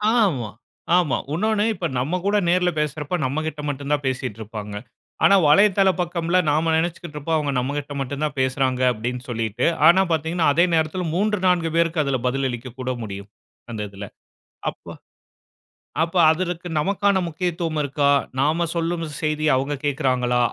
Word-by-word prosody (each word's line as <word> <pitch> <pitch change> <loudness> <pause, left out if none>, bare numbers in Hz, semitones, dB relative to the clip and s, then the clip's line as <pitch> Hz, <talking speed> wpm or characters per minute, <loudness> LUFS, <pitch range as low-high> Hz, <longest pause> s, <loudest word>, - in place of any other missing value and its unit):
ஆமா, 165 - +1 0.5
ஆமா. 170 -6 +2 0.2
உன்னோன்னு, 210 +5 +1
இப்ப 180 - -4
நம்ம 155 +9 -1
கூட 205 +1 +2
நேர்ல 180 0 +3
பேசுறப்ப, 150 +2 -2
நம்ம 140 +4 -1
கிட்ட 150 -1 -5
மட்டுந்தான் 145 +1 -2
பேசிட்ருப்பாங்க. 110 -5 -5 0.5
ஆனா 200 - +7
வலைதள 195 +5 +5
பக்கம்ல, 170 0 0
நாம 155 +3 +2
நெனச்சிக்கிட்ருப்போம், 160 -2 -2
அவுங்க 145 -2 -1
நம்மகிட்ட 145 +3 -3
மட்டுந்தான் 140 +1 -3
பேசுறாங்க. 130 -1 0
அப்டின்னு 120 +3 -4
சொல்லிட்டு, 115 0 -2 0.2
ஆனா 190 +3 +6
பாத்தீங்கன்னா, 160 +1 0
அதே 170 +4 +4
நேரத்துல, 160 +3 0
3,4 185 -4 +1
பேருக்கு 165 -1 +2
அதில 140 -2 -1
பதிலளிக்கக் 125 -1 -3
கூட 130 0 -2
முடியும். 100 -1 -7 0.4
அந்த 110 -2 -4
இதில. 100 +1 -8 0.7
அப்ப - - -23 1.2
அப்ப, 165 +2 -2 0.2
அதற்கு 175 +1 -3
நமக்கான 200 +4 +1
முக்கியத்துவம் 170 -1 -2
இருக்கா? 140 0 0 0.3
நாம 155 +5 +2
சொல்லும் 170 0 -1 0.2
செய்திய 155 0 0
அவுங்க 135 +3 -1
கேக்குறாங்களா? 130 -4 +1
150 Hz, 135 wpm, -22 LUFS, 130-175 Hz, 1.2 s, ஆனா